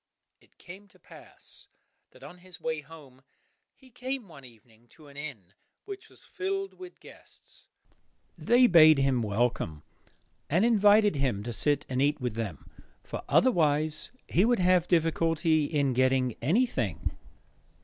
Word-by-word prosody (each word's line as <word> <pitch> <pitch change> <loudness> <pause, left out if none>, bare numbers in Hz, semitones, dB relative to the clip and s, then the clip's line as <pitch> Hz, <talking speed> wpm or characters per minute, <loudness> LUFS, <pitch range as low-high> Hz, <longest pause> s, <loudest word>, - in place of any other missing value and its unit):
It - - -29
came 190 +3 -13
to - - -24
pass - - -6 0.4
that - - -19
on 180 - -12
his 180 -1 -8
way 160 -1 -3
home, 140 -4 -16 0.5
he 260 -2 -21
came 255 -1 -5
one 140 -5 -14
evening 115 -1 -19
to 155 -2 -18
an 140 - -17
inn 130 - -9 0.3
which 400 -1 -9
was - - -19
filled 390 0 -4
with 365 -1 -11
guests. - - -14 0.7
They 245 +2 +4
bade 155 - +7
him 135 -3 +1
welcome, 105 -8 -2 0.7
and 175 +8 +2
invited 210 -5 +4
him 125 -7 -1
to 120 +1 -5
sit 145 +4 0
and 130 0 -2
eat 145 +1 +1
with 125 -4 -3
them, 105 -9 -6 0.4
for - - -7
otherwise 155 - +2 0.2
he 180 - +2
would 240 +2 +3
have 180 -1 +2
difficulty 165 -1 +1
in 145 -3 0
getting 130 -1 +1
anything. 140 - -1
155 Hz, 145 wpm, -28 LUFS, 130-195 Hz, 0.7 s, bade